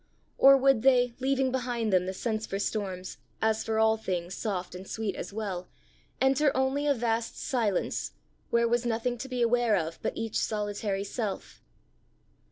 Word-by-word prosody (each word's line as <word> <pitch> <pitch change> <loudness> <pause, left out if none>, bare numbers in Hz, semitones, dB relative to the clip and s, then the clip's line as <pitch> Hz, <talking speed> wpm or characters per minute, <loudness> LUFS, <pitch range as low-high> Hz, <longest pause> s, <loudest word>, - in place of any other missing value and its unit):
or 275 0 +8
would 270 -3 +4
they, 245 -1 +4
leaving 265 0 +1
behind 240 -4 -1
them 185 0 +3
the - - -1
sense 220 +1 -2
for 195 - -3
storms, 190 -3 -3 0.2
as 220 0 +1
for 220 0 -1
all 220 0 +4
things 180 -4 -3
soft 190 -4 -3
and 185 +1 -9
sweet 220 -3 -3
as - - -6
well, 195 -4 -4 0.5
enter 270 +3 +4
only 270 +2 +1
a 285 - +5
vast 230 -1 -1
silence, 225 -9 -1 0.4
where 235 0 +3
was 240 +1 +1
nothing 240 +1 -1
to 265 +3 -7
be 250 -2 0
aware 235 -2 +3
of 165 -3 -2
but - - -3
each 225 -1 -1
solitary 205 -2 -2
self? 205 -1 -5
225 Hz, 170 wpm, -28 LUFS, 200-250 Hz, 0.5 s, or